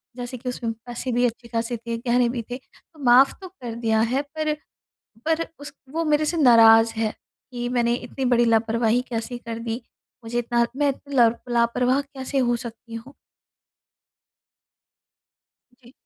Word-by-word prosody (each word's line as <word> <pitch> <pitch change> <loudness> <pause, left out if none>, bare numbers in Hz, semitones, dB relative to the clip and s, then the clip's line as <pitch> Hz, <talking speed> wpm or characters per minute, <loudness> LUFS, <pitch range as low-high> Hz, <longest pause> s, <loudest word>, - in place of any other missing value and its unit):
जैसे 245 0 -6
कि 250 +2 -5
उसमें 240 -2 -3
पैसे 245 +1 -4
भी 245 +1 +2
अच्छे-खासे 235 0 -3
थे, 230 +1 -5
गहने 240 +1 +2
भी 240 0 -3
थे। 245 - -3
तो 300 +4 -25
माफ़ 255 +2 +6
तो 380 - -7
कर 250 -11 -8
दिया 225 -2 +1
है 245 +5 +1
पर, 310 +1 -2 0.7
पर 325 +1 +1
उस 285 - -9 0.2
वो 330 +2 -1
मेरे 305 0 +2
से 335 +2 -1
नाराज़ 225 -4 +7
है 220 -1 0 0.4
कि 240 -1 -4
मैंने 240 -1 +1
इतनी 250 +2 -5
बड़ी 240 -1 +3
लापरवाही 230 +1 +2
कैसे 240 +1 -4
कर 230 -1 -7
दी, 230 +1 -4 0.4
मुझे 235 +1 -2
इतना 235 0 +1
मैं 290 +1 +2
इतनी 280 +1 -6
लर 235 -2 +5 0.2
लापरवाह 245 +3 +2
कैसे 275 -1 -6
हो 240 -2 +2
सकती 235 -1 -9
हूँ? 235 +5 -8 2.7
जी। 240 +1 -18
240 Hz, 160 wpm, -23 LUFS, 230-265 Hz, 2.7 s, नाराज़